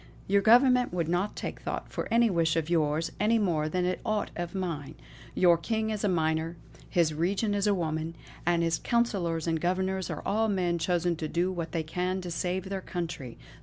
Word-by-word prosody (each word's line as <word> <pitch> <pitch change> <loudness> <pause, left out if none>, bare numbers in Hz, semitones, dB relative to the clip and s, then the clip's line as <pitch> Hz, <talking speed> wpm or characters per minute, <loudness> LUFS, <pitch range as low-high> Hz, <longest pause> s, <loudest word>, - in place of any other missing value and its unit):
Your 200 +1 +3
Government 250 +3 +5
would 170 -3 -1
not 180 +5 0
take - - -5
thought - - -4
for - - -3
any 235 +1 +5
wish 165 -5 +2
of 165 0 -1
yours, 155 -1 +1
any 220 +3 +3
more 165 -7 +1
than 180 +2 0
for 180 0 -1
aught 215 -2 -1
of 175 +1 -4
mine. 155 -6 -3 0.4
Your 175 -2 +5
King 220 +4 -1
is 215 -1 -3
a 205 - +2
minor; 160 -1 0 0.3
his 165 -3 +2
regent 195 +7 0
is 205 0 +1
a 205 - +3
woman, 160 -1 -2 0.3
and 170 -1 +2
his 165 -1 +1
councillors 190 -9 0
and 165 -2 0
governors 190 +1 0
are - - -5
all 220 +2 +2
men 180 -4 0
chosen 175 0 +1
to 155 - -3
do 175 +4 0
what 170 -3 -4
they 165 -2 -1
can 180 +4 -2
to 180 -1 -6
save 180 +2 -2
their 195 -1 -3
country. 165 -10 -5
175 Hz, 205 wpm, -29 LUFS, 165-195 Hz, 0.4 s, Government